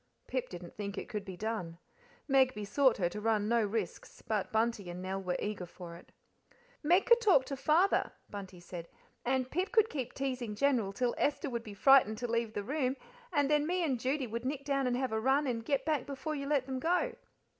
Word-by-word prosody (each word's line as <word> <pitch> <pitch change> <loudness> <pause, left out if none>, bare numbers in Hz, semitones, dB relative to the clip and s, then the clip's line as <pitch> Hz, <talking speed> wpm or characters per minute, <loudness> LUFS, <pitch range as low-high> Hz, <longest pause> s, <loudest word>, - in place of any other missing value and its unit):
Pip 255 -1 -3
didn't 175 -1 -9
think 200 -1 -5
it - - -4
could 210 -4 -3
be 190 -3 -8
done; 210 -6 -3 0.5
Meg 265 -2 +4
besought 225 +5 +2
her 180 - +1
to 210 +4 -6
run 215 -1 +1
no 235 +1 +3
risks; 210 -3 -4
but 210 -3 -1
Bunty 220 -4 0
and 175 +1 -6
Nell 190 +1 -3
were 180 -1 -1
eager 205 -4 -3
for 170 -1 -10
it. 170 - -15 0.7
"Meg 350 +5 +4
could 475 0 +6
talk 365 - +5
to 275 - -4
Father," 325 +8 +3 0.2
Bunty 195 -3 -8
said, 175 -1 -8 0.4
"and 255 0 0
Pip 365 +4 -1
could 445 -2 +4
keep 255 -4 -4
teasing 255 -5 -3
General 240 -5 +2
till 240 +4 0
Esther 285 -2 0
would 235 -1 -2
be 210 -3 -9
frightened 250 -2 +6
to 245 - -3
leave 230 -1 -1
the 205 - -3
room, 260 +2 0 0.4
and 290 -4 +2
then 300 +1 +2
me 360 +1 +1
and 265 -7 0
Judy 265 +3 0
would 230 0 -4
nick 275 +1 -3
down 275 -2 +1
and 245 0 +1
have 260 -2 -1
a 220 0 0
run, 270 +4 +3
and 235 -4 -2
get 275 +3 0
back 300 -5 0
before 280 +2 -4
you 280 -2 -4
let 285 -3 +2
them 260 -1 -3
go." 360 - +1
250 Hz, 220 wpm, -32 LUFS, 210-280 Hz, 0.7 s, could